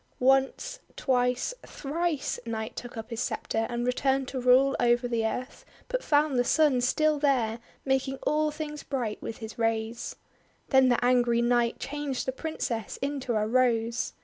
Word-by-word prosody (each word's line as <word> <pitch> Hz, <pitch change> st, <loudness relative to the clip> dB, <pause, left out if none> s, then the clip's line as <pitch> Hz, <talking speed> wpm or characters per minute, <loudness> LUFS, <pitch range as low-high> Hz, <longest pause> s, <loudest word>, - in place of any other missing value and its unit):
Once, 270 Hz, -, +2 dB, 0.2 s
twice, 250 Hz, -, +1 dB
thrice, 310 Hz, 0 st, -2 dB
Night 220 Hz, -1 st, -4 dB
took 245 Hz, -1 st, -7 dB
up 225 Hz, +2 st, -7 dB
his 230 Hz, -, -4 dB
sceptre, 225 Hz, -2 st, -1 dB
and 240 Hz, 0 st, -2 dB
returned 265 Hz, +1 st, +1 dB
to 260 Hz, -2 st, -4 dB
rule 255 Hz, +2 st, +5 dB
over 240 Hz, 0 st, +3 dB
the 230 Hz, -2 st, 0 dB
earth, 250 Hz, +4 st, -3 dB, 0.3 s
but -, -, -2 dB
found 290 Hz, -3 st, +2 dB
the -, -, +4 dB
Sun 285 Hz, -2 st, +3 dB
still 305 Hz, +4 st, +2 dB
there, 245 Hz, -6 st, +1 dB, 0.3 s
making 265 Hz, 0 st, 0 dB
all 305 Hz, 0 st, +2 dB
things 300 Hz, 0 st, -5 dB
bright 240 Hz, -6 st, -3 dB
with 225 Hz, -, -5 dB
his 225 Hz, 0 st, -9 dB
rays. 225 Hz, 0 st, -1 dB, 0.5 s
Then 265 Hz, -2 st, +5 dB
the 245 Hz, 0 st, +2 dB
angry 240 Hz, -1 st, +3 dB
Night 240 Hz, -1 st, +2 dB
changed 290 Hz, -2 st, -3 dB
the 260 Hz, -, 0 dB
Princess 255 Hz, -7 st, -4 dB
into 275 Hz, -4 st, -2 dB
a 215 Hz, 0 st, +1 dB
Rose. 235 Hz, 0 st, +1 dB
250 Hz, 160 wpm, -28 LUFS, 235-275 Hz, 0.5 s, rule